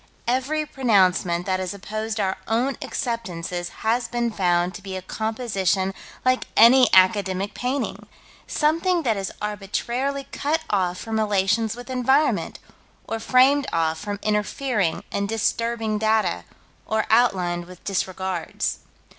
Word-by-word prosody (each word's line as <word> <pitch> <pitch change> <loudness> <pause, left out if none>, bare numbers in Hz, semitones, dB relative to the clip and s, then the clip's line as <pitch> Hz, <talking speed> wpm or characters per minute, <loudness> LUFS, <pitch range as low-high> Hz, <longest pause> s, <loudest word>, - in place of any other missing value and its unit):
Every 265 +5 0
pronouncement 185 -10 +2
that 185 -1 0
has 185 +1 -3
opposed 215 +2 -4
our 190 -2 0
own 245 +5 +1
acceptances 180 -7 -3 0.2
has 235 +2 +1
been 240 -1 -1
found 180 -3 +1
to 205 - -9
be 190 -1 -6
a - - -5
composition 200 -3 -1 0.3
like 255 0 +2
any 250 +3 +7
academic 190 0 +3
painting: 260 +3 -3 0.4
something 335 +3 +1
that 230 -5 +1
is 195 -1 -3
arbitrarily 235 +7 -2
cut 310 +3 -1
off 180 -3 +1
from 220 +1 -3
relations 210 +1 +1
with 245 +2 -9
environment, 265 +4 +2 0.5
or 225 - -3
framed 265 +4 +4
off 160 -1 0
from 205 -1 -4
interfering 210 - 0
and 200 0 -1
disturbing 225 0 0
data, 215 -4 +1 0.4
or 220 0 0
outlined 185 -7 +2
with 180 -1 -13
disregards. 190 -2 -2
215 Hz, 130 wpm, -23 LUFS, 190-245 Hz, 0.5 s, any